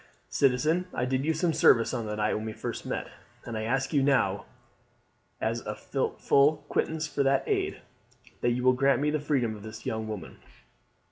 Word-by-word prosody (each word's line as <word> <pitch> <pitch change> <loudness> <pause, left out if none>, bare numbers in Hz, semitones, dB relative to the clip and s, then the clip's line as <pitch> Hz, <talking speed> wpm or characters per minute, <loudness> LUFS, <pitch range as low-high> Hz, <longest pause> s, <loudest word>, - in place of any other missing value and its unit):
Citizen, 150 +7 +2
I 125 - 0
did 130 +2 -1
you 160 - +2
some 165 +1 +1
service 115 -6 +4
on 115 -2 -2
the 105 - -3
night 105 0 0
when 110 - -3
we 110 - -4
first - - -5
met; - - -3 0.4
and 115 - -5
I 110 0 -2
ask 135 +6 -1
you 145 - +4
now, 125 -8 +2 0.9
as - - -1
a - - -5
full 145 +1 +1
quittance 160 0 -1
for 145 - -2
that 135 0 +2
aid, - - -1 0.6
that 120 - +2
you 125 +1 -1
will 130 0 +5
grant 135 +2 +3
me 150 +1 +1
the 155 - 0
freedom 135 -7 0
of 105 - -11
this 110 +1 -9
young 110 0 -2
woman. 105 -7 -7
130 Hz, 195 wpm, -28 LUFS, 110-145 Hz, 0.9 s, will